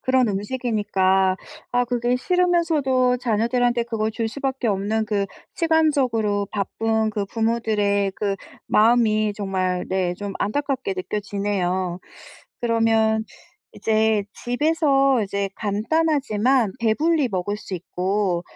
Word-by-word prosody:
그런 260 Hz, -2 st, +2 dB
음식이니까 195 Hz, -4 st, +1 dB, 0.4 s
아 245 Hz, 0 st, +3 dB
그게 245 Hz, 0 st, 0 dB
싫으면서도 310 Hz, -6 st, +2 dB
자녀들한테 240 Hz, +1 st, +1 dB
그걸 225 Hz, -2 st, -2 dB
줄 225 Hz, 0 st, -2 dB
수밖에 265 Hz, -1 st, -2 dB
없는 215 Hz, +2 st, 0 dB
그 200 Hz, -2 st, 0 dB, 0.3 s
시간적으로 260 Hz, -, +1 dB
바쁜 220 Hz, +2 st, 0 dB
그 205 Hz, -1 st, -2 dB
부모들의 210 Hz, -3 st, 0 dB
그 200 Hz, -2 st, -1 dB, 0.3 s
마음이 215 Hz, -1 st, +3 dB
정말 185 Hz, -3 st, -1 dB
네 185 Hz, -2 st, 0 dB
좀 205 Hz, -1 st, -4 dB
안타깝게 260 Hz, -2 st, -1 dB
느껴지네요. 190 Hz, -2 st, -2 dB, 0.6 s
그러면 225 Hz, -2 st, +2 dB, 0.5 s
이제 220 Hz, -1 st, +1 dB, 0.2 s
집에서 275 Hz, -1 st, +2 dB
이제 200 Hz, 0 st, -2 dB
간단하지만 245 Hz, -1 st, +1 dB
배불리 285 Hz, +5 st, +2 dB
먹을 195 Hz, +2 st, -2 dB
수 200 Hz, -, -7 dB
있고 185 Hz, +1 st, -1 dB
220 Hz, 260 characters per minute, -22 LUFS, 200-250 Hz, 0.6 s, 아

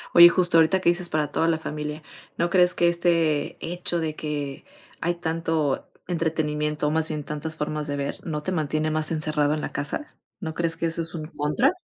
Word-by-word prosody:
Oye, 175 Hz, 0 st, +11 dB
justo 175 Hz, -1 st, +3 dB
ahorita 175 Hz, +4 st, +4 dB
que 170 Hz, -, +3 dB
dices 175 Hz, 0 st, +1 dB
para 150 Hz, -2 st, 0 dB
toda 165 Hz, -, +1 dB
la 165 Hz, -1 st, +2 dB
familia, 150 Hz, 0 st, -5 dB, 0.3 s
¿no 170 Hz, 0 st, 0 dB
crees 180 Hz, -1 st, +4 dB
que 175 Hz, -, +3 dB
este 165 Hz, -4 st, +1 dB
hecho 175 Hz, 0 st, -2 dB
de 155 Hz, -1 st, -2 dB
que 145 Hz, -3 st, -4 dB, 0.4 s
hay 175 Hz, +1 st, 0 dB
tanto 160 Hz, -4 st, -1 dB, 0.2 s
entretenimiento, 150 Hz, -3 st, -1 dB
o -, -, +1 dB
más 160 Hz, 0 st, +1 dB
bien 150 Hz, -2 st, -4 dB
tantas 150 Hz, +2 st, -5 dB
formas 150 Hz, 0 st, -3 dB
de 145 Hz, -, -2 dB
ver, 140 Hz, 0 st, -3 dB
no 150 Hz, -2 st, -4 dB
te 185 Hz, -, -2 dB
mantiene 155 Hz, -2 st, 0 dB
más 155 Hz, 0 st, +3 dB
encerrado 155 Hz, -1 st, +1 dB
en 150 Hz, -, -4 dB
la -, -, -3 dB
casa?, 145 Hz, -, -3 dB, 0.2 s
¿no 160 Hz, -5 st, -4 dB
crees 165 Hz, -1 st, -1 dB
que 165 Hz, -, -1 dB
eso 165 Hz, +1 st, -1 dB
es 165 Hz, +1 st, -6 dB
un 155 Hz, -1 st, -4 dB
contra? 150 Hz, -, +1 dB
160 Hz, 205 wpm, -25 LUFS, 150-170 Hz, 0.4 s, Oye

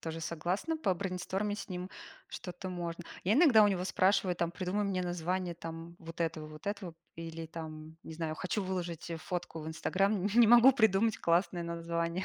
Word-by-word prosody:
тоже 165 Hz, 0 st, -5 dB
согласна 175 Hz, -, -2 dB
побрейнстормить, 195 Hz, -, -2 dB
с -, -, -8 dB
ним 180 Hz, 0 st, -5 dB, 0.4 s
что-то 180 Hz, +1 st, -7 dB
можно. 175 Hz, -1 st, -5 dB, 0.2 s
Я 200 Hz, +5 st, +3 dB
иногда 270 Hz, -8 st, +7 dB
у 205 Hz, -, +6 dB
него 185 Hz, -2 st, 0 dB
спрашиваю, 185 Hz, -1 st, +2 dB
там: 170 Hz, -1 st, -1 dB
придумай 185 Hz, +3 st, -2 dB
мне 190 Hz, -2 st, 0 dB
название 175 Hz, 0 st, -2 dB
там 165 Hz, +1 st, -8 dB
вот 165 Hz, 0 st, -10 dB
этого, 160 Hz, -2 st, -1 dB
вот 155 Hz, +3 st, -12 dB
этого 200 Hz, -5 st, -3 dB, 0.2 s
или 165 Hz, 0 st, -6 dB
там, 160 Hz, -1 st, -8 dB
не 160 Hz, -, -9 dB
знаю, 155 Hz, -1 st, -3 dB
хочу 190 Hz, +5 st, -2 dB
выложить, 175 Hz, -3 st, -4 dB
э, 165 Hz, -, -2 dB
фотку 175 Hz, 0 st, -5 dB
в 155 Hz, -, -6 dB
"Инстаграм", 195 Hz, +4 st, +1 dB
не 235 Hz, -2 st, +7 dB
могу 240 Hz, +3 st, +9 dB
придумать 220 Hz, -2 st, +3 dB
классное 175 Hz, +1 st, +1 dB
название. 170 Hz, +1 st, -2 dB
180 Hz, 175 wpm, -32 LUFS, 165-195 Hz, 0.4 s, могу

